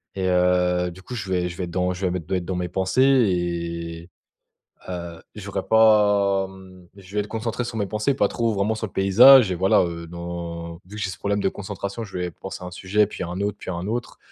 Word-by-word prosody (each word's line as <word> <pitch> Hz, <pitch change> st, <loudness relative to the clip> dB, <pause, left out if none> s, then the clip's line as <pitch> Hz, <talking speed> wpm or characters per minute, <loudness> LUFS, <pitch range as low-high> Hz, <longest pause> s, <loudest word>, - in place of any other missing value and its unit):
et 95 Hz, -1 st, -1 dB
heu 90 Hz, 0 st, +2 dB
du 95 Hz, -, -13 dB
coup 125 Hz, +7 st, -8 dB
je 100 Hz, -4 st, -5 dB
vais 90 Hz, -1 st, 0 dB
je 85 Hz, -, -9 dB
vais 95 Hz, -, -3 dB
être 85 Hz, -, -5 dB
dans 90 Hz, +1 st, 0 dB
je 95 Hz, +1 st, -4 dB
vais 90 Hz, -, +1 dB
me 90 Hz, -, -2 dB
doit 90 Hz, +3 st, -2 dB
être 85 Hz, -, -5 dB
dans 95 Hz, +1 st, -3 dB
mes 90 Hz, 0 st, -2 dB
pensées 95 Hz, +7 st, 0 dB
et 85 Hz, -8 st, 0 dB, 0.8 s
heu, 85 Hz, -2 st, -6 dB
j'aurais 100 Hz, -2 st, -4 dB
pas, 105 Hz, -3 st, +4 dB
mmh 95 Hz, -2 st, -15 dB
je 95 Hz, 0 st, -14 dB
vais 105 Hz, -, +2 dB
être 105 Hz, -, -3 dB
concentré 115 Hz, +2 st, -3 dB
sur 115 Hz, -2 st, -5 dB
mes 100 Hz, -, 0 dB
pensées 110 Hz, +7 st, 0 dB
pas 135 Hz, -, +2 dB
trop 115 Hz, -2 st, 0 dB
vraiment 105 Hz, +2 st, 0 dB
sur 110 Hz, 0 st, -4 dB
le -, -, -14 dB
paysage 115 Hz, +4 st, +7 dB
et 90 Hz, -, 0 dB
voilà, 95 Hz, +2 st, +3 dB
heu, 85 Hz, -1 st, -5 dB
dans 85 Hz, -1 st, -6 dB
vu 100 Hz, +3 st, -11 dB
que 105 Hz, -, -4 dB
j'ai -, -, -1 dB
ce -, -, -8 dB
problème 100 Hz, 0 st, -1 dB
de 95 Hz, -, +2 dB
concentration, 100 Hz, +2 st, -5 dB
je 95 Hz, -3 st, -7 dB
vais 90 Hz, -1 st, -2 dB
penser 95 Hz, +2 st, -9 dB
à -, -, -6 dB
un -, -, -6 dB
sujet, 100 Hz, +3 st, +1 dB
puis 100 Hz, -, -7 dB
à 85 Hz, -, -4 dB
un 90 Hz, +2 st, -5 dB
autre, 105 Hz, 0 st, -1 dB
puis -, -, -7 dB
à 90 Hz, -, -3 dB
un 85 Hz, +3 st, -4 dB
autre. 120 Hz, +2 st, -4 dB
95 Hz, 255 wpm, -23 LUFS, 90-105 Hz, 0.8 s, paysage